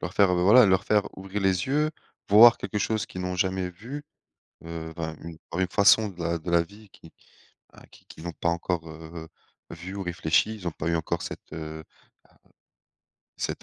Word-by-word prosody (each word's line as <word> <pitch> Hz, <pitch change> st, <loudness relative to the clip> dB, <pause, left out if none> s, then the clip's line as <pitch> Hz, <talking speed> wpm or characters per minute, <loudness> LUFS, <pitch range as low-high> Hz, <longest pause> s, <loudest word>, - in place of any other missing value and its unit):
Leur 90 Hz, -, -5 dB
faire, 100 Hz, -2 st, +4 dB
heu, 90 Hz, -1 st, +1 dB
voilà, 110 Hz, +7 st, +7 dB
leur 95 Hz, 0 st, +2 dB
faire 105 Hz, -1 st, +3 dB
ouvrir 95 Hz, +2 st, -5 dB
les 95 Hz, -1 st, +1 dB
yeux, 150 Hz, +3 st, +1 dB, 0.4 s
voir 115 Hz, +3 st, +9 dB
quelque 105 Hz, -, -4 dB
chose 110 Hz, +1 st, 0 dB
qu'ils 95 Hz, -, -8 dB
n'ont 90 Hz, 0 st, -3 dB
jamais 95 Hz, 0 st, 0 dB
vu, 125 Hz, +11 st, -8 dB, 0.6 s
heu, 80 Hz, -1 st, -6 dB
vin 80 Hz, -2 st, -4 dB
une 85 Hz, -1 st, -8 dB
en 85 Hz, -, -4 dB
une 95 Hz, -, +1 dB
façon 105 Hz, +3 st, +5 dB
de 95 Hz, -3 st, -12 dB
la 85 Hz, 0 st, -1 dB
de 85 Hz, +2 st, -6 dB
la 85 Hz, -1 st, +4 dB
vie 100 Hz, +4 st, -15 dB
qu'ils, 80 Hz, -, -16 dB, 0.6 s
bah, -, -, -16 dB
qu'ils -, -, -20 dB
qu'ils 80 Hz, -, -12 dB
n'ont 85 Hz, -, -4 dB
pas 85 Hz, -, -2 dB
encore, 85 Hz, -1 st, -2 dB
heu, 80 Hz, +1 st, -9 dB, 0.4 s
vue 90 Hz, +4 st, -8 dB
ou 100 Hz, -, -3 dB
réfléchie, 90 Hz, +4 st, +1 dB
ils 90 Hz, -5 st, -5 dB
ont -, -, -5 dB
pas 80 Hz, -, -4 dB
eu 85 Hz, -, +1 dB
encore 80 Hz, -, -2 dB
cette, -, -, -8 dB
heu, -, -, -6 dB, 0.2 s
ah, -, -, -9 dB
heu, 80 Hz, -, -13 dB, 1.5 s
cette -, -, -4 dB
90 Hz, 210 wpm, -26 LUFS, 85-100 Hz, 1.5 s, voir